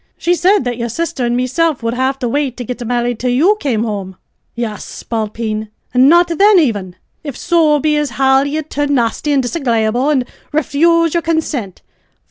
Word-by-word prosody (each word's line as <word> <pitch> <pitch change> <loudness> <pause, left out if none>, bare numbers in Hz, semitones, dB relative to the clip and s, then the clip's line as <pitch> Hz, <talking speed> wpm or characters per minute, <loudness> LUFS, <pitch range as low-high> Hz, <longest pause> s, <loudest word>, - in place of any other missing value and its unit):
She 350 - +1
sid 365 0 +2
that 245 -1 -3
yer 235 - -2
sisther 265 -1 -2
an' 240 0 0
mesilf 270 +2 0
wu'ld 230 0 -1
have 260 +2 0
to 255 -3 -3
wait 275 0 -1
to 250 - -4
git 245 +1 -5
marri'd 240 0 -1
till 250 - -1
you 315 +12 +3
came 240 - -1
home, 200 -4 -4 0.4
ye 235 0 -2
spalpeen; 215 -1 -4 0.2
an' 255 +2 +5
not 345 +2 +5
thin 400 +4 +4
aven, 205 - 0 0.3
if 285 -5 -6
so 330 -4 +2
be 300 +1 +1
as 295 -1 0
how 265 +2 +3
ye'd 300 +2 -3
turn 290 0 0
nasty 240 +4 0
an' 280 -2 +3
disagreyable, 245 -2 0
an' 265 -4 +1 0.3
refuse 325 +2 +2
yer 340 - +1
consint. 305 - -3
265 Hz, 185 wpm, -16 LUFS, 235-310 Hz, 0.4 s, an